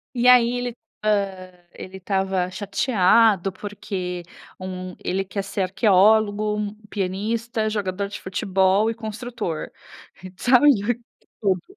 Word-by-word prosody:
E 240 Hz, 0 st, +1 dB
aí 245 Hz, -2 st, +7 dB
ele, 245 Hz, -1 st, -4 dB, 0.3 s
hã, 195 Hz, -3 st, -1 dB, 0.2 s
ele 190 Hz, +1 st, -9 dB
estava 190 Hz, -1 st, -1 dB
chateado 200 Hz, 0 st, +2 dB
porque 185 Hz, -2 st, -5 dB, 0.4 s
um 185 Hz, -1 st, -6 dB
ele 195 Hz, +1 st, -1 dB
quer 200 Hz, +1 st, -4 dB
ser 195 Hz, 0 st, -4 dB
arqueólogo, 210 Hz, +1 st, +2 dB
pianista, 215 Hz, +4 st, -2 dB
jogador 200 Hz, -2 st, -2 dB
de 200 Hz, -, -8 dB
futebol 190 Hz, +2 st, +1 dB
e -, -, -4 dB
construtor, 220 Hz, -6 st, -5 dB, 0.7 s
sabe, 250 Hz, +7 st, +5 dB, 0.7 s
tudo. 190 Hz, -4 st, +1 dB
200 Hz, 105 wpm, -23 LUFS, 185-220 Hz, 0.7 s, aí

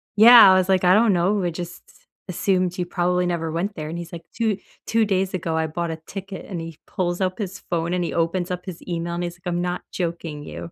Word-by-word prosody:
yeah, 225 Hz, -1 st, +10 dB
I 185 Hz, -, +6 dB
was 185 Hz, 0 st, +1 dB
like, 190 Hz, -1 st, +3 dB
"I 180 Hz, 0 st, +6 dB
don't 215 Hz, 0 st, +5 dB
know, 190 Hz, +3 st, +1 dB
I 175 Hz, -, +1 dB
just 175 Hz, +1 st, -7 dB, 0.5 s
assumed 185 Hz, 0 st, 0 dB
you 180 Hz, -, -1 dB
probably 180 Hz, 0 st, 0 dB
never 170 Hz, -2 st, -2 dB
went 185 Hz, +5 st, -2 dB
there." 155 Hz, -1 st, -5 dB
And 170 Hz, -, -5 dB
he's 170 Hz, 0 st, -8 dB
like, 165 Hz, -1 st, -8 dB
"2 220 Hz, -4 st, 0 dB, 0.3 s
2 225 Hz, -1 st, +2 dB
days 190 Hz, -1 st, 0 dB
ago, 165 Hz, -3 st, -2 dB
I 160 Hz, 0 st, 0 dB
bought 170 Hz, +1 st, -3 dB
a 160 Hz, -, -5 dB
ticket." 195 Hz, 0 st, -7 dB
And 180 Hz, -4 st, -5 dB
he 165 Hz, -1 st, -8 dB
pulls 175 Hz, 0 st, -2 dB
up 185 Hz, 0 st, 0 dB
his 195 Hz, -2 st, -4 dB
phone, 170 Hz, 0 st, 0 dB
and 180 Hz, -1 st, 0 dB
he -, -, -3 dB
opens 175 Hz, +2 st, 0 dB
up 180 Hz, 0 st, -4 dB
his 180 Hz, -3 st, -7 dB
email, 170 Hz, 0 st, -3 dB
and 175 Hz, -, -2 dB
he's 175 Hz, 0 st, -4 dB
like, 180 Hz, 0 st, -12 dB
"I'm 175 Hz, 0 st, -1 dB
not 180 Hz, 0 st, -2 dB
joking 170 Hz, -4 st, -4 dB
you. 165 Hz, -, -8 dB
180 Hz, 250 wpm, -23 LUFS, 170-190 Hz, 0.5 s, yeah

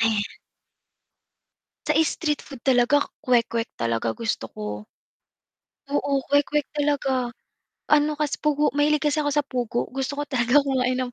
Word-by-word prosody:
Ayan. 220 Hz, -2 st, +1 dB, 1.5 s
Sa 305 Hz, 0 st, +2 dB
street 300 Hz, -3 st, -1 dB
food 270 Hz, -4 st, -11 dB
talaga, 260 Hz, +2 st, +4 dB, 0.2 s
kwek-kwek 235 Hz, -2 st, +2 dB
talaga 115 Hz, -1 st, -1 dB
gusto 225 Hz, -, -2 dB
ko. 105 Hz, 0 st, -6 dB, 1.0 s
Oo 285 Hz, 0 st, 0 dB, 0.2 s
kwek-kwek 285 Hz, 0 st, +2 dB
talaga, 285 Hz, -2 st, +1 dB, 0.8 s
ano 300 Hz, 0 st, +5 dB
kasi 295 Hz, -1 st, -1 dB
pugo 300 Hz, 0 st, +2 dB
mahilig 295 Hz, +1 st, +2 dB
kasi 295 Hz, +1 st, +2 dB
ako 290 Hz, -, 0 dB
sa 295 Hz, -, +3 dB
pugo 245 Hz, -3 st, -2 dB
gusto 270 Hz, +1 st, -2 dB
ko 290 Hz, -, -2 dB
talaga 255 Hz, -2 st, +1 dB
kumain 255 Hz, -2 st, +1 dB
ng 255 Hz, -1 st, -2 dB
270 Hz, 135 wpm, -24 LUFS, 235-290 Hz, 1.5 s, ano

